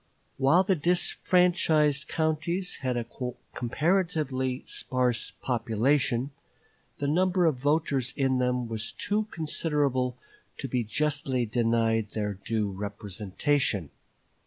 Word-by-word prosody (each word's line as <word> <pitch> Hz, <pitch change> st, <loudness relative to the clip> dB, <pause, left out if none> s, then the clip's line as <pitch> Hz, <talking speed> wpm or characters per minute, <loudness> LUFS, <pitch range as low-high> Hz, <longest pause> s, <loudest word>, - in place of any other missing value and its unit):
While 145 Hz, +7 st, +4 dB
the 190 Hz, -, +2 dB
disfranchised 170 Hz, -3 st, +2 dB
counties 160 Hz, +4 st, -1 dB
had 130 Hz, -2 st, -2 dB
a 120 Hz, -, -2 dB, 0.5 s
comparatively 140 Hz, -2 st, 0 dB
sparse 125 Hz, -2 st, -1 dB
population, 125 Hz, +2 st, +1 dB, 0.7 s
the 145 Hz, -, -3 dB
number 180 Hz, +3 st, +2 dB
of 155 Hz, -5 st, +2 dB
voters 140 Hz, -2 st, +1 dB
in 130 Hz, -2 st, +2 dB
them 125 Hz, -1 st, 0 dB
was 110 Hz, -1 st, -3 dB
too 210 Hz, +1 st, -1 dB
considerable 145 Hz, -, -1 dB, 0.4 s
to 135 Hz, -, -4 dB
be 125 Hz, -1 st, 0 dB
justly 135 Hz, +1 st, 0 dB
denied 115 Hz, -1 st, +1 dB
their 105 Hz, -2 st, -1 dB
due 105 Hz, +1 st, -2 dB
representation. 100 Hz, -, -1 dB
130 Hz, 105 wpm, -28 LUFS, 115-155 Hz, 0.7 s, While